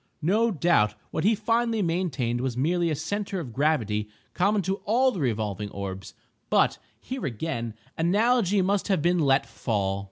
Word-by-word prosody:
No 215 +8 +3
doubt 150 - +2 0.2
what 155 - -2
he 220 +3 +4
finally 225 0 +1
maintained 150 -9 -1
was 130 -2 -2
merely 170 +5 +1
a 155 - 0
centre 195 +6 -3
of 130 -9 -7
gravity 110 -8 0 0.2
common 200 +2 +2
to 190 +3 -1
all 250 +6 +2
the 195 - -5
revolving 105 - -2
orbs—but 95 -1 -2 0.2
here 255 - -4
again 115 -3 -4 0.2
analogy 205 +2 +3
must 200 +1 0
have 190 -7 +1
been 175 +1 +3
let 135 -3 +3
fall. 100 -4 -2
165 Hz, 155 wpm, -26 LUFS, -, 0.2 s, he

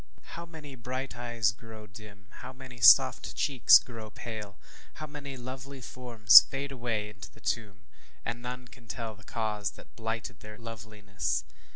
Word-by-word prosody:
How 170 0 -8
many 155 -4 -11
bright 130 +1 -5
eyes 120 -3 0
grow 110 0 -12
dim 100 -1 -14 0.2
how 125 +1 -8
many 130 -2 -12
soft - - +6
cheeks 135 -5 +6
grow 115 -3 -8
pale 105 -3 -8 0.4
how 155 - -6
many 145 -2 -8
lovely 130 +2 -8
forms 120 -7 +7
fade 140 +1 -4
away 115 -5 -3
into 100 -2 -11
the - - -19
tomb, 100 -4 -3 0.4
and 120 +1 -4
none 125 +1 -7
can 120 -1 -17
tell 115 0 -5
the 110 +1 -18
cause 105 -2 -3
that - - -17
blighted 115 0 -5
their 105 0 -11
loveliness! 105 -6 -4
115 Hz, 160 wpm, -29 LUFS, 105-130 Hz, 0.4 s, forms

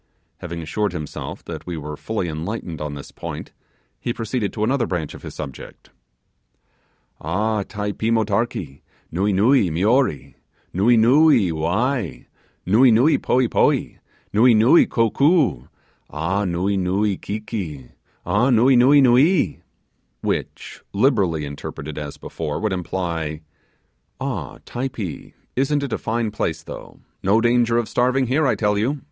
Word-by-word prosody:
Having 85 -1 -6
assured 105 +6 -1
himself 75 -2 -6
that - - -8
we 85 -2 -4
were 75 0 -6
fully 105 +3 -3
enlightened 85 +1 -5
on 75 -1 -4
this 70 - -9
point, - - -7 0.5
he 120 - -2
proceeded 115 -2 -2
to 105 - -3
another 120 0 +1
branch 80 -5 -3
of - - -11
his - - -9
subject. 65 -3 -9 1.3
'Ah! 105 +7 0
Typee 105 +2 -3
mortakee! 110 - -1 0.3
nuee, 100 +5 +1
nuee 105 +1 +4
mioree 100 - +1 0.4
nuee, 115 +6 +4
nuee 125 - +5
wai 100 - -1 0.4
nuee, 115 +8 +5
nuee 125 +8 +4
poee 125 -1 +2
poee - - +1 0.3
nuee, 115 +3 +5
nuee 115 +10 +6
kokoo 130 - +2 0.4
ah! 85 +7 -1
nuee, 95 +3 0
nuee 95 +3 +1
kiki 95 - -6 0.3
ah! 125 - +2
nuee, 125 +2 +5
nuee, 135 +4 +6
nuee!' 130 - +3 0.6
Which - - -4
literally 100 - +2
interpreted 75 +1 -7
as 75 -1 -7
before, 75 -3 -5
would 105 -2 -1
imply, 85 -4 -3 0.8
'Ah, - - -4
Typee! 120 - -5 0.2
isn't 140 +2 +1
it 140 - -3
a - - -2
fine 115 -1 -1
place 85 -6 -3
though! - - -10 0.2
no 100 +4 +3
danger 120 0 +2
of 120 -2 0
starving 130 +2 +1
here, 140 +4 +1
I - - +2
tell 105 -1 +1
you! 135 +7 0
105 Hz, 135 wpm, -21 LUFS, 85-120 Hz, 1.3 s, nuee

